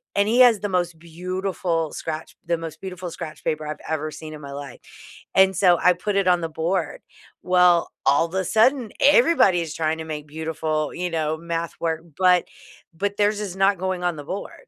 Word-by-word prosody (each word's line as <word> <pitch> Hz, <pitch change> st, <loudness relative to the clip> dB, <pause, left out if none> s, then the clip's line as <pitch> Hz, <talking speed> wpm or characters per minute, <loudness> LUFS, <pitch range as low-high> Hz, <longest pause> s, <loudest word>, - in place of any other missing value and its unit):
And 200 Hz, 0 st, +3 dB
he 235 Hz, +3 st, +2 dB
has 240 Hz, -4 st, +6 dB
the 205 Hz, -, -2 dB
most 175 Hz, -3 st, -1 dB
beautiful 175 Hz, -1 st, -3 dB
scratch 160 Hz, 0 st, -6 dB
the 170 Hz, 0 st, 0 dB
most 165 Hz, -2 st, -7 dB
beautiful 185 Hz, -1 st, -6 dB
scratch 155 Hz, -1 st, -8 dB
paper 155 Hz, 0 st, -2 dB
I've 150 Hz, -, -4 dB
ever 155 Hz, -1 st, -2 dB
seen 155 Hz, 0 st, -9 dB
in 150 Hz, -, -11 dB
my 140 Hz, -1 st, -8 dB
life. 140 Hz, -3 st, -8 dB, 0.6 s
And 190 Hz, 0 st, +5 dB
so 180 Hz, -1 st, +4 dB
I 180 Hz, -, +5 dB
put 195 Hz, +3 st, -3 dB
it 195 Hz, -2 st, +2 dB
on 180 Hz, -1 st, +4 dB
the 165 Hz, -, -3 dB
board. 165 Hz, +1 st, -2 dB, 0.4 s
Well, 180 Hz, -2 st, +4 dB, 0.2 s
all 155 Hz, +4 st, +4 dB
the 190 Hz, +2 st, -2 dB
sudden, 230 Hz, +3 st, +2 dB
everybody 255 Hz, -, +5 dB
is 160 Hz, -2 st, -5 dB
trying 160 Hz, 0 st, 0 dB
to 160 Hz, -, -5 dB
make 150 Hz, -1 st, -6 dB
beautiful, 155 Hz, 0 st, -3 dB
you 180 Hz, 0 st, -3 dB
know, 160 Hz, -1 st, -1 dB
math 170 Hz, 0 st, -4 dB
work, 165 Hz, -1 st, -1 dB, 0.2 s
but 180 Hz, -1 st, +4 dB, 0.5 s
but 200 Hz, +4 st, -3 dB
theirs 210 Hz, 0 st, +2 dB
is 195 Hz, -3 st, -5 dB
not 195 Hz, +1 st, +3 dB
going 185 Hz, -1 st, -2 dB
on 175 Hz, -1 st, 0 dB
the 145 Hz, -, -7 dB
board. 195 Hz, +6 st, -5 dB
175 Hz, 200 wpm, -23 LUFS, 160-190 Hz, 0.6 s, has